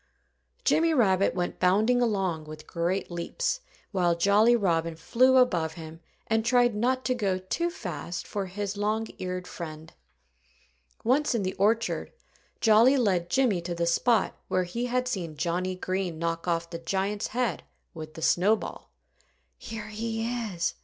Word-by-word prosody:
Jimmy 330 -6 +3
Rabbit 195 - +3
went 175 -1 -2
bounding 215 +7 +3
along 190 -9 0
with 155 0 -10
great 175 +3 -2
leaps, 330 - -2 0.3
while 175 -4 +2
Jolly 210 +6 +5
Robin 165 -6 0
flew 255 +10 +3
above 175 -11 +3
him 160 0 -9 0.3
and 225 0 +1
tried 240 0 +3
not 255 +5 0
to 255 - +2
go 200 -6 0
too 190 - -2
fast 175 - -5
for 200 -2 -3
his 200 +2 -4
long 215 +2 0
eared 180 0 -4
friend. 160 -3 -8 1.1
Once 265 +3 +2
in 220 - 0
the 185 0 -2
orchard, 220 +4 0 0.5
Jolly 230 +5 +6
led 185 -8 +1
Jimmy 240 -8 +2
to 170 0 -4
the 170 0 0
spot 215 +6 +2
where 185 - +1
he 230 +8 -3
had 250 +1 0
seen 175 -10 -4
Johnnie 180 +3 -1
Green 185 -2 -2
knock 165 +1 -2
off 170 0 -1
the 170 - -5
giant's 195 +4 -1
head 235 - -1 0.3
with 155 -1 -9
the 160 - -6
snowball. 205 +5 +1 0.7
"Here 215 -1 -7
he 225 +1 -3 0.3
is!" 170 -1 -1
195 Hz, 155 wpm, -27 LUFS, 170-230 Hz, 1.1 s, Jolly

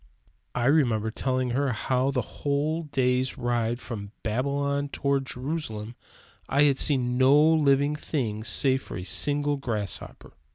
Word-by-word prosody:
I 120 -1 0
remember 120 -7 +2
telling 130 +1 -1
her 135 +1 0
how 130 +4 0
that 135 -2 0
in - - -10
a - - -19
whole 150 +3 -2
day's 130 -2 0
ride 120 -1 -1
from 105 -5 -7
Babylon 140 +5 -1
toward 140 -1 -1
Jerusalem 125 -6 -5 0.5
I 140 +2 +3
had 140 -2 +3
seen 125 -3 +3
no 135 +3 +6
living 150 -2 +3
thing 115 -8 -3
save 130 +4 +2
a 90 - -5
single 145 +7 +1
grasshopper! 110 -7 -4
130 Hz, 140 wpm, -26 LUFS, 120-145 Hz, 0.5 s, no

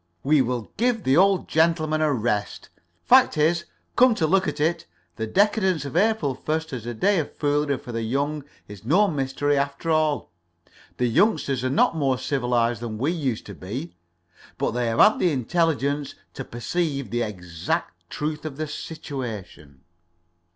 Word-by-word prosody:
We 145 +1 +4
will 125 -3 -3
give 235 -1 +1
the 130 - +3
old 195 +1 +4
gentleman 160 -1 +2
a 155 -1 +2
rest!' 110 -5 -2 0.3
Fact - - +5
is, 170 +3 +2 0.3
come 250 -2 +5
to 165 - +1
look 190 +4 +2
at - - -3
it, 160 - 0 0.3
the 110 0 -3
decadence 190 - +2
of 140 - -7
April 185 -8 +2
1st 160 +3 -3
as 120 -3 -5
a 120 - -4
day 195 - +2
of 155 - -5
foolery 145 -1 +1
for 120 - -9
the 115 0 -3
young 140 +6 -1 0.2
is 100 -1 -11
no 180 - +4
mystery, 145 -2 0
after 140 +4 -1
all. 155 - +1 0.7
The 125 - +1
youngsters 135 - +2
are 130 - 0
not 140 +4 +2
more 135 -4 +1
civilized 120 -4 0
than 115 -2 -5
we 140 +8 0
used 135 -10 -2
to 100 - -8
be, 115 - -6 0.6
but - - 0
they 120 0 -1
have 115 0 -1
had 215 - +6
the 180 - +2
intelligence 145 0 0 0.2
to 135 - -6
perceive 140 - -3
the 120 - 0
exact 90 -6 -4
truth 150 0 -4
of 150 -3 -6
the 155 - -2
situation." 115 - -7
145 Hz, 170 wpm, -24 LUFS, 120-160 Hz, 0.7 s, had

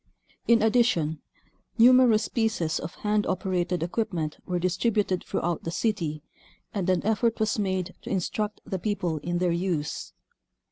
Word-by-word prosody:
In 230 -2 +5
addition, 215 -10 +2 0.6
numerous 240 -2 +6
pieces 220 -9 0
of 170 - -7
hand 210 0 +2
operated 180 -2 -1
equipment 170 -5 -2
were 180 - 0
distributed 185 +1 0
throughout 170 -1 -2
the - - -3
city, 165 -6 -1 0.5
and 195 -3 -1
an 185 -1 +1
effort 220 +2 +1
was 215 0 +1
made 190 -2 -1
to - - -8
instruct 205 +3 -2
the 190 - -3
people 175 -6 -1
in 175 +4 -2
their 180 0 +1
use. 170 -4 -2
185 Hz, 140 wpm, -26 LUFS, 170-215 Hz, 0.6 s, numerous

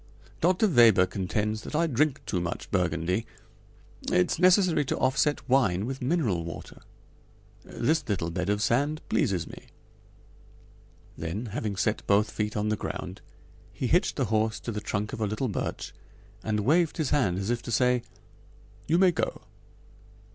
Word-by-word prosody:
Dr. 185 +5 +3
Weber 110 -6 +7
contends 105 +3 -2
that - - -7
I 165 +2 +3
drink 150 -1 0
too 90 - -1
much 85 0 -5
Burgundy. 90 +2 0 0.8
It's 90 - +2
necessary 185 -3 +4
to - - -2
offset 145 +2 +1
wine 110 -8 +2
with 135 +2 -5
mineral 125 - 0
water. 85 0 -9 0.8
This 155 -4 -1
little 85 -5 -1
bed 90 +3 -2
of 105 +1 +1
sand 145 +7 +1
pleases 95 - +1
me." - - -12 1.5
Then, 85 +8 -4
having 105 -3 -2
set 105 +3 0
both 105 +2 +3
feet 105 0 -2
on 105 +1 0
the 110 - +1
ground, - - -6 0.5
he - - -4
hitched - - +2
the - - 0
horse 110 0 +1
to 115 - -4
the 105 -1 -4
trunk 105 0 -3
of - - -5
a 105 - +1
little 110 +5 -2
birch 100 - -4 0.5
and 105 -1 0
waved 160 +8 +2
his 155 -5 -1
hand 125 -12 +2
as 100 +4 -2
if 120 -1 -1
to 120 - -7
say: 125 +1 +3 0.9
"You 165 - +3
may 185 0 +5
go." 165 - -3
110 Hz, 160 wpm, -27 LUFS, 100-145 Hz, 1.5 s, Weber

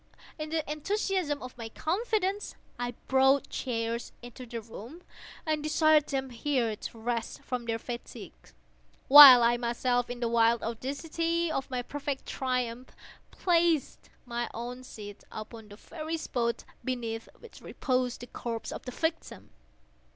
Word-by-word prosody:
In 305 0 -4
the 320 -1 -2
enthusiasm 315 -1 -1
of 255 - -8
my 225 -1 -5
confidence, 405 - -1 0.2
I 245 0 -3
brought 265 +1 +3
chairs 230 -2 -3
into 245 +1 -10
the 235 0 -5
room, 230 - -11 0.4
and 310 -1 0
desired 310 0 +4
them 265 -2 -2
here 240 -2 0
to 225 - -8
rest 230 0 -3
from 250 -2 -4
their 225 -1 -1
fatigues, 235 +1 -9 0.5
while 270 -3 +12
I 240 +1 +4
myself, 245 +1 0
in 245 0 -5
the 240 - 0
wild 230 0 +3
audacity 325 +8 -2
of 270 -3 -2
my 250 -2 -2
perfect 285 +1 -4
triumph, 250 -1 -3 0.3
placed 335 -4 +1 0.2
my 240 -1 -3
own 245 +2 -6
seat 205 -4 -10
upon 215 0 -8
the 205 - -12
very 315 +7 -5
spot 235 -6 -2 0.2
beneath 230 -3 -3
which 470 - -14
reposed 255 -3 -1
the - - -6
corpse 230 -2 -5
of - - -6
the 250 - -5
victim. 320 +5 -3
255 Hz, 145 wpm, -29 LUFS, 235-305 Hz, 0.5 s, while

